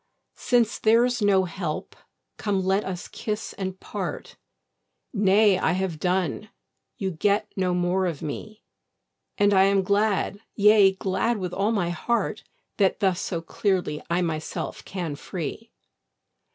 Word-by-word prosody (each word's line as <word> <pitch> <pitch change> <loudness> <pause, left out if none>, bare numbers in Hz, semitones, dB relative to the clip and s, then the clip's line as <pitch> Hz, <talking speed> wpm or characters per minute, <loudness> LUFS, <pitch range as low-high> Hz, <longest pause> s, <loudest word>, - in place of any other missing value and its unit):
Since 240 -3 +2
there's 235 +2 +3
no 200 -2 +4
help, 170 -3 -4 0.4
come 200 -3 -1
let 190 +2 +2
us 180 -2 -5
kiss 215 -1 -4
and 190 -1 -5
part: - - -5 0.8
Nay, 200 -1 +4
I - - +2
have 185 -4 -2
done, 185 +3 -1 0.5
you 195 -5 -2
get 205 +5 0
no 185 -2 0
more 180 +1 +1
of 165 -5 -4
me; 215 +8 -6 0.7
And 205 0 +4
I 190 0 +6
am 195 -1 +3
glad, 200 0 +1 0.2
yea, 205 -2 +6
glad 195 +5 0
with 180 -3 -4
all 200 +4 +1
my 180 -6 0
heart, 235 +7 -1 0.3
That 195 -3 +2
thus 190 -3 +1
so 170 -3 -3
clearly 180 -5 -1
I 175 +1 +1
myself 155 -2 -4
can 175 -6 -4
free. 185 +9 -6
190 Hz, 140 wpm, -25 LUFS, 180-210 Hz, 0.8 s, I